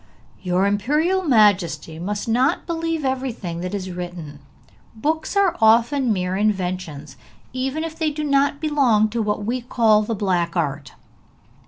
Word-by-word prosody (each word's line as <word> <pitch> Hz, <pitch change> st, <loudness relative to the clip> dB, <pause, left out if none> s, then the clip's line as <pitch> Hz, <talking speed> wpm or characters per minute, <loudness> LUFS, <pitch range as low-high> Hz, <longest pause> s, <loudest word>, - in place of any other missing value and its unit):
'Your 180 Hz, +1 st, +1 dB
imperial 300 Hz, -, +1 dB
majesty 205 Hz, -, +2 dB
must 205 Hz, +5 st, -4 dB
not 250 Hz, +4 st, +1 dB
believe 330 Hz, -3 st, -2 dB
everything 250 Hz, -10 st, -3 dB
that 180 Hz, +3 st, -4 dB
is 190 Hz, -2 st, -5 dB
written; 175 Hz, -5 st, -7 dB, 0.6 s
books 315 Hz, -, -2 dB
are 390 Hz, -4 st, +3 dB
often 235 Hz, +4 st, +4 dB
mere 185 Hz, -2 st, -1 dB
inventions, 180 Hz, -9 st, -2 dB, 0.4 s
even 265 Hz, +4 st, -2 dB
if 325 Hz, -1 st, -5 dB
they 315 Hz, -1 st, +1 dB
do 300 Hz, +1 st, -4 dB
not 280 Hz, 0 st, +1 dB
belong 265 Hz, -9 st, +2 dB
to 230 Hz, +1 st, -2 dB
what 210 Hz, -1 st, -2 dB
we 245 Hz, +3 st, -2 dB
call 225 Hz, -3 st, +3 dB
the 220 Hz, +1 st, -3 dB
black 180 Hz, -4 st, -1 dB
art!' 145 Hz, -5 st, -2 dB
215 Hz, 145 wpm, -21 LUFS, 180-280 Hz, 0.6 s, often